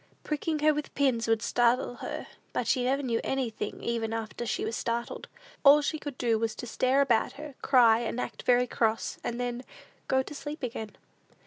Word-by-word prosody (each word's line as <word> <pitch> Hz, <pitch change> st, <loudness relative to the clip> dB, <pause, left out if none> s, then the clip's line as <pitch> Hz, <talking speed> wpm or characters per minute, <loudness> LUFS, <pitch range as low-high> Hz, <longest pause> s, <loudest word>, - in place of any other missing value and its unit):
Pricking 305 Hz, +1 st, -1 dB
her 310 Hz, -, +6 dB
with 300 Hz, 0 st, -5 dB
pins 255 Hz, -5 st, +2 dB
would 225 Hz, 0 st, +2 dB
startle 240 Hz, +1 st, +2 dB
her, -, -, -5 dB, 0.3 s
but -, -, -1 dB
she 255 Hz, -, +2 dB
never 275 Hz, +2 st, +1 dB
knew 235 Hz, -3 st, 0 dB
anything 240 Hz, -6 st, -3 dB
even 225 Hz, -1 st, -1 dB
after 225 Hz, +1 st, -4 dB
she -, -, -1 dB
was 225 Hz, -, -2 dB
startled. 235 Hz, 0 st, -3 dB, 0.4 s
All 295 Hz, +1 st, +8 dB
she 310 Hz, +1 st, -1 dB
could 290 Hz, -4 st, -6 dB
do 230 Hz, -2 st, +1 dB
was 225 Hz, -1 st, -1 dB
to -, -, -6 dB
stare 255 Hz, +3 st, +2 dB
about 240 Hz, -5 st, +2 dB
her, 300 Hz, 0 st, -8 dB
cry, 235 Hz, -4 st, +5 dB
and 235 Hz, +1 st, -3 dB
act -, -, -4 dB
very 245 Hz, 0 st, +4 dB
cross, 225 Hz, -2 st, -1 dB
and 240 Hz, 0 st, -3 dB
then 245 Hz, 0 st, -3 dB, 0.4 s
go 265 Hz, 0 st, +2 dB
to 295 Hz, -, -9 dB
sleep 295 Hz, 0 st, -7 dB
again. 220 Hz, -4 st, -5 dB
245 Hz, 195 wpm, -29 LUFS, 230-275 Hz, 0.4 s, All